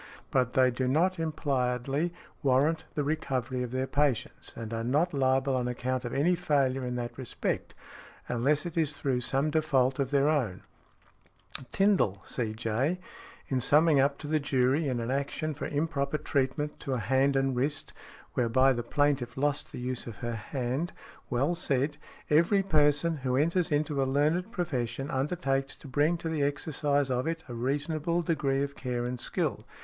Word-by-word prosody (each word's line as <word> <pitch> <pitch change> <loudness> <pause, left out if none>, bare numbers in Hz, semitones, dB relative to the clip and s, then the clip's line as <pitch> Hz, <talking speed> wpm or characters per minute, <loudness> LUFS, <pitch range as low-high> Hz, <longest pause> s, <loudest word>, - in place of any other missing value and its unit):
But 125 -2 +2
they 130 -1 +4
do 125 +1 -1
not 170 +7 +2
impliedly 140 -1 0 0.3
warrant 145 +3 +2
the 150 - 0
recovery 130 -4 -1
of 125 - -2
their 130 +2 -1
patients, 140 -3 -1
and 115 -1 -6
are 115 0 -2
not 150 +9 +1
liable 135 0 +2
on 125 -1 0
account 125 +1 -2
of 120 - -3
any 160 +6 +2
failure 135 -6 +1
in 125 0 -3
that 120 -1 -4
respect, 130 - -3 0.5
unless 140 +6 +1
it 170 - -5
is 155 -3 0
through 130 -3 0
some 135 +5 +1
default 135 -5 +2
of 135 -2 0
their 140 0 +3
own. 130 -12 0 1.1
Tindal, 195 - +3
C.J., 115 +8 -1 0.5
in 130 -2 0
summing 150 +3 +5
up 140 +1 +3
to 150 - -8
the 155 +1 +2
jury 140 +2 +2
in 125 -3 -1
an 115 +2 -2
action 140 +3 -2
for 145 - -4
improper 145 -1 -1
treatment 145 +1 -1
to 135 - -3
a - - 0
hand 135 +4 +2
and 135 -1 +1
wrist, 145 +4 -2 0.4
whereby 130 +2 +3
the 120 - -2
plaintiff 135 0 0
lost 145 +1 0
the - - -7
use 125 0 -3
of 115 - -6
her 120 - -2
hand, 130 - -3 0.4
well 135 +7 +1
said, 145 -4 0 0.3
"Every 170 +6 +4
person 155 -2 +3
who 130 -2 -1
enters 170 +4 +2
into 145 -1 +1
a - - +2
learned 155 +9 +1
profession 135 - -2
undertakes 135 -1 -1
to - - -13
bring 150 +6 +2
to 165 - -5
the 160 -2 -1
exercise 145 -1 0
of 125 +3 0
it 165 0 -2
a 120 - -7
reasonable 150 +7 -1
degree 140 -5 +1
of 140 0 -4
care 125 -2 -3
and 125 0 -3
skill. - - -1
140 Hz, 170 wpm, -29 LUFS, 125-155 Hz, 1.1 s, summing